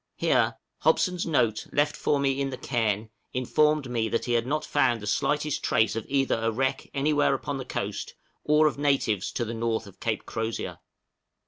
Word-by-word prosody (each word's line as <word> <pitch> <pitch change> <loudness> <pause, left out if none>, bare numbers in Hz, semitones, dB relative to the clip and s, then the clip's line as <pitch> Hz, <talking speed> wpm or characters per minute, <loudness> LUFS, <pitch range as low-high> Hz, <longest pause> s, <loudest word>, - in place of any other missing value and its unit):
Here - - +2 0.2
Hobson's 180 -2 +2
note 115 -9 +1
left 145 0 +1
for 145 - +1
me 135 0 +1
in 135 - 0
the 130 - -5
cairn 110 -4 -1 0.2
informed 150 +3 +2
me 115 -2 -1
that 115 - -1
he 120 - 0
had 120 0 +1
not 150 +2 -1
found 120 -3 +2
the 105 - -8
slightest 150 +7 0
trace 110 -1 +2
either 135 -1 +1
of 115 - -5
a 115 - +2
wreck 130 +3 -1
anywhere 145 0 +2
upon 140 +1 -4
the 130 - -5
coast, - - -4 0.3
or 150 +1 +4
of 145 -2 +1
natives 135 -9 +1
to 120 - -1
the 115 - -4
north 115 -1 -1
of 100 -2 -14
Cape 110 -2 -2
Crozier. 110 0 -4
130 Hz, 190 wpm, -27 LUFS, 115-145 Hz, 0.3 s, or